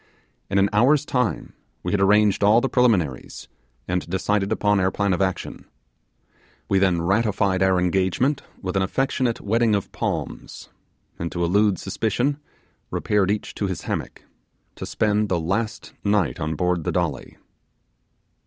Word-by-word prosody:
In 100 - 0
an 100 0 +4
hour's 135 +7 +4
time 125 -7 -1 0.3
we - - -2
had 100 - +1
arranged 105 +1 +4
all 105 +3 +6
the 135 - 0
preliminaries, 105 - 0 0.4
and 90 -1 -2
decided 100 +2 0
upon 105 -1 +2
our 95 0 +2
plan 100 0 0
of 90 - -1
action. 95 -1 -3 1.0
We 95 - +2
then 90 -3 +2
ratified 100 -1 +1
our 95 -1 +3
engagement 95 - +1 0.2
with 95 0 -3
an 95 - +2
affectionate 125 +3 0
wedding 115 +1 +2
of 100 - -3
palms, - - -5 0.5
and 85 0 -3
to 85 - -2
elude 100 +3 +2
suspicion 120 +8 -1 0.5
repaired 105 -2 0
each 105 +1 -2
to 100 - -2
his 95 -4 -4
hammock, - - -5 0.5
to - - -6
spend 105 -1 +1
the 90 - +1
last 105 +7 -3
night 100 -4 +1
on 80 -1 -2
board 90 0 0
the - - -1
Dolly. - - -3
100 Hz, 150 wpm, -23 LUFS, 95-110 Hz, 1.0 s, all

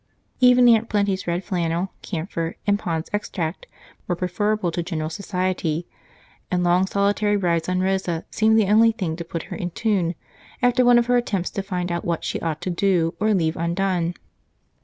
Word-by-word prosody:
Even 250 -1 +6
Aunt 230 -1 +4
Plenty's 200 -3 0
red 175 +2 -1
flannel, 175 -1 -1
camphor, 165 -2 -4
and 205 -1 +2
Pond's 165 -5 -3
Extract 185 -5 -3 0.4
were 175 - 0
preferable 185 +2 -1
to 175 - -2
general 160 -2 -3
society, 180 -4 -2 0.6
and 180 -1 0
long 175 +2 +3
solitary 205 +1 +1
rides 170 -3 0
on 185 0 +1
Rosa 185 -3 -1
seemed 220 0 +3
the 220 - +4
only 225 +3 +5
thing 185 -8 -3
to 170 - -4
put 165 -1 -5
her - - -4
in 175 - -3
tune 180 -3 0 0.4
after 245 +1 +3
one 245 0 +6
of 240 - +3
her 245 +1 +3
attempts 195 -7 -1
to 195 - -3
find 180 -2 -3
out 170 0 -2
what 170 -2 -2
she - - -2
ought 160 -1 -3
to 185 - -2
do 175 -2 +1
or 215 0 +2
leave 160 -3 +1
undone. 175 0 -1
185 Hz, 180 wpm, -23 LUFS, 170-205 Hz, 0.6 s, Even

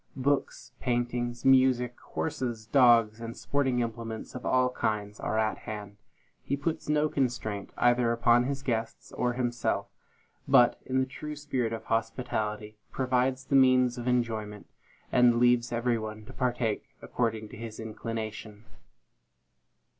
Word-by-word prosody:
Books, 140 +1 -1
paintings, 120 -1 -2
music, 130 -2 +4
horses, 120 -7 -4
dogs, 115 -3 +4
and 115 0 -6
sporting 125 +2 0
implements 115 -1 -5
of 125 - -6
all 130 0 +3
kinds, 105 -4 -2
are 110 - -2
at 110 -1 0
hand. 105 -1 -7 0.4
He 140 - -2
puts 160 +1 -3
no 150 0 +3
constraint, 120 -8 -2
either 120 -1 +3
upon 120 +1 +4
his 140 +1 -3
guests 115 -3 -3
or 125 0 -1
himself, 120 -2 -1 0.6
but, 120 -1 +5
in 130 - 0
the 130 - +2
true 150 +3 -7
spirit 135 -6 -2
of 110 -1 -5
hospitality, 110 -2 -2
provides 130 0 0
the 140 - 0
means 130 -2 +4
of 120 - -5
enjoyment, 110 -4 -1 0.5
and 125 -1 +5
leaves 120 0 +3
every 120 0 0
one 110 0 -7
to 130 - -11
partake 120 -4 -2
according 110 -3 -2
to - - -10
his 110 -1 -8
inclination. 110 -1 -6
120 Hz, 140 wpm, -29 LUFS, 110-130 Hz, 0.6 s, but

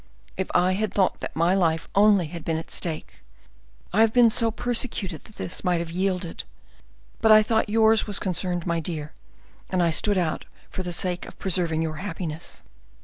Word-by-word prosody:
"If 190 - -3
I 180 +1 +4
had 205 +1 -1
thought 190 -2 +1
that - - -6
my 170 +3 +2
life 165 -4 +1
only 200 -2 +5
had 165 +1 -8
been 160 -1 -1
at 165 - -7
stake, 160 -3 -4 0.8
I 215 - +4
have 225 -1 +5
been 235 -1 +5
so 230 +1 +3
persecuted 220 - -3
that 210 -5 -7
I - - -2
might 180 -2 +2
have 170 -1 -4
yielded; 180 -1 -2 0.8
but 220 - +5
I 215 0 +8
thought 220 0 0
yours 220 0 +3
was 205 -2 0
concerned, 180 -2 -1
my 170 -2 0
dear 155 -2 -5
sire, - - -30
and 185 -2 +1
I 170 - +2
stood 205 +5 +2
out 170 -4 -1 0.3
for - - -4
the 180 -1 -4
sake 175 +1 -1
of - - -12
preserving 170 -4 -1
your 155 -1 -4
happiness." 165 -3 -6
180 Hz, 195 wpm, -25 LUFS, 170-210 Hz, 0.8 s, I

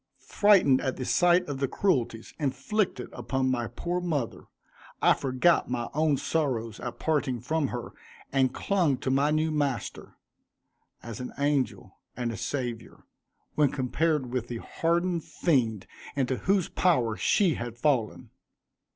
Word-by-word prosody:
Frightened 190 -11 +4
at 130 - -1
the 130 - -4
sight 175 +4 +3
of 140 -2 -4
the 135 - +1
cruelties 120 - -1
inflicted 160 - -1
upon 130 +2 -1
my 120 -2 -1
poor 175 +7 -3
mother, 150 -9 -3 0.5
I - - +5
forgot 135 +5 +2
my 120 -1 -2
own 155 -1 +2
sorrows 125 -9 -1
at 120 - -6
parting 140 -6 0
from 150 +5 0
her 120 -2 -5 0.4
and 130 -2 +3
clung 175 -8 +1
to 130 - -2
my 140 +2 +3
new 155 +1 +1
master, 145 -4 -3 0.9
as 115 0 -7
an 125 - -6
angel 140 -2 -1 0.2
and 120 -2 -1
a - - -5
saviour, 120 -1 -5 0.5
when 150 -2 +3
compared 135 0 0
with 125 -2 -2
the 120 - -4
hardened 170 +5 -1
fiend 115 - 0 0.3
into 130 -2 0
whose 195 -2 +1
power 125 -12 +1
she 175 - +2
had 120 -2 -6
fallen. 125 -4 0
135 Hz, 140 wpm, -28 LUFS, 125-160 Hz, 0.9 s, I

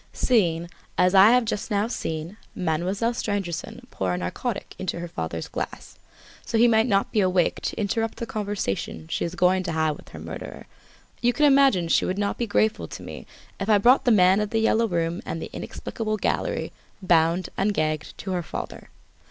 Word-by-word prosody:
"Seeing, 175 -9 +2 0.3
as 180 +1 +4
I 195 +2 +8
have 250 0 +4
just 215 0 -3
now 205 0 +1
seen, 165 -4 -4 0.2
Mademoiselle 185 +7 0
Stangerson 195 -7 -4
pour 95 -1 -2
a - - -3
narcotic 190 - -4
into 185 -2 -3
her 175 - -5
father's 80 - -4
glass, - - -6 0.4
so 235 - -1
that - - +4
he - - +7
might 225 0 +4
not 200 -3 +1
be 215 - +1
awake 185 -2 +1
to - - -3
interrupt 220 +2 -1
the 235 - -3
conversation 200 - -3
she - - -1
is 170 +1 -5
going 185 +1 +3
to 175 -2 -3
have 160 -2 0
with - - -16
her - - -10
murderer, - - -8 0.6
you 245 0 +3
can 300 - +3
imagine 270 -11 +5
she - - +3
would 185 - -2
not 200 0 -1
be 235 - -1
grateful 215 +1 +1
to - - -9
me - - -9 0.3
if 195 - -3
I 210 - +6
brought 245 +6 +5
the - - +4
man 190 -2 +5
of 210 -1 -1
"The 225 - -1
Yellow 225 +1 +3
Room" 170 -2 -1
and 165 - -4
the - - -7
inexplicable 215 -2 -4
gallery, - - -1 0.3
bound 170 0 +3
and 200 +2 +1
gagged, 155 -5 -2
to 190 - -5
her 180 -1 0
father. - - -7
195 Hz, 200 wpm, -25 LUFS, 170-225 Hz, 0.6 s, I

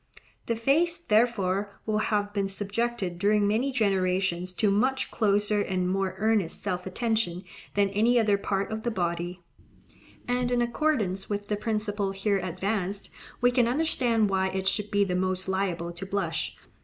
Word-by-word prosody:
The 230 - +1
face, 310 +9 +2
therefore, 210 - +1
will 215 -1 +1
have 205 -1 0
been 200 -1 0
subjected 200 -2 -2
during 205 +1 +3
many 235 +7 +1
generations 185 -5 +1
to 205 +2 +2
much 260 +6 +1
closer 210 -1 +2
and 185 -2 -1
more 190 0 -1
earnest 215 -5 0
self 185 -2 -2
attention 215 -3 -1 0.3
than 200 -1 +3
any 225 +5 +3
other 210 -3 +3
part 200 0 -2
of 220 0 -3
the 240 - -1
body; 175 -3 -3 0.8
and 245 0 0
in 245 - +2
accordance 235 -6 0
with 205 0 -3
the 210 - +1
principle 210 -2 -1
here 195 0 0
advanced 195 +2 -3 0.3
we 245 0 +5
can 245 -2 +3
understand 240 -6 +1
why 190 0 +2
it 190 0 -2
should 210 +1 0
be 200 0 +3
the 190 -2 -1
most 185 +1 0
liable 185 -3 -1
to 175 +3 -6
blush. 200 +1 -2
205 Hz, 160 wpm, -27 LUFS, 190-225 Hz, 0.8 s, we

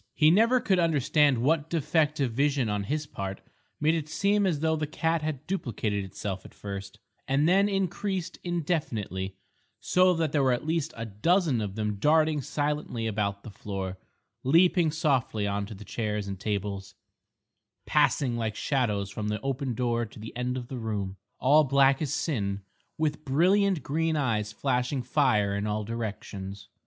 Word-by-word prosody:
He 155 0 +5
never 230 +7 +5
could 190 -6 +2
understand 145 -5 +3
what 150 +2 +2
defect 155 -1 +1
of 130 -4 +1
vision 140 -1 +1
on 105 -1 -1
his 150 +7 -2
part 95 -8 -5 0.4
made 155 +2 +3
it 155 -2 -2
seem 200 +3 +2
as 155 -6 0
though 160 0 +2
the 155 -1 -2
cat 160 +2 0
had 150 -2 -4
duplicated 110 - -2
itself 95 0 -5
at - - -14
first, 100 -1 -7 0.3
and 140 +3 +2
then 195 +3 +4
increased 190 -1 -2
indefinitely, 125 - -2 0.4
so 185 0 +3
that 160 -3 0
there 145 - +2
were 130 -2 +3
at 120 - -3
least 160 -1 0
a 115 - -4
dozen 140 - +1
of 100 -2 -4
them 105 -2 -2
darting 155 +4 +3
silently 145 -5 -2
about 100 -2 -1
the 110 - -9
floor, 95 -2 -5 0.4
leaping 170 +4 +4
softly 135 -9 0
on 100 0 -1
to 110 - -8
chairs 105 -3 -2
and 95 -1 -5
tables, 100 -2 -3 0.9
passing 125 -4 +2
like 110 -2 -2
shadows 105 -8 0
from 105 +1 -4
the 105 0 -1
open 135 -2 -2
door 120 0 0
to - - -15
the 110 +2 -9
end 125 +1 -2
of 125 -2 -6
the 130 -1 -5
room, 105 -4 -3 0.2
all 150 +4 +5
black 135 0 +4
as 145 -4 -1
sin, 100 - -1 0.4
with 155 -1 -1
brilliant 180 +4 +3
green 160 +2 0
eyes 110 -8 0
flashing 125 +4 -1
fire 120 -7 +2
in 100 +1 -2
all 105 0 -1
directions. 100 -3 -6
130 Hz, 165 wpm, -28 LUFS, 105-155 Hz, 0.9 s, He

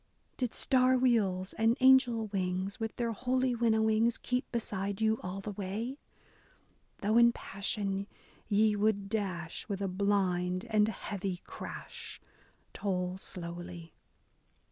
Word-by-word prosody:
Did 250 -3 -2
star 255 -1 +4
wheels 200 -7 +2
and 225 +2 +3
angel 255 -4 +5
wings, 190 0 -2
with 225 -1 -3
their 235 -1 -1
holy 255 +3 0
winnowings, 225 0 +2
Keep 250 +1 -2
beside 200 -4 -2
you 220 0 +2
all 185 +2 -5
the 210 - -5
way? 210 +8 -4 1.0
Though 215 +3 +4
in 235 0 +7
passion 200 -2 -2 0.4
ye 210 0 +4
would 205 -1 +1
dash, 185 -5 -3
with 200 -1 -2
a 200 - -1
blind 185 -1 0
and 210 -1 +4
heavy 195 -3 -4
crash. - - -8 0.5
Toll 180 -2 -2
slowly. 175 -2 -7
205 Hz, 120 wpm, -31 LUFS, 190-230 Hz, 1.0 s, in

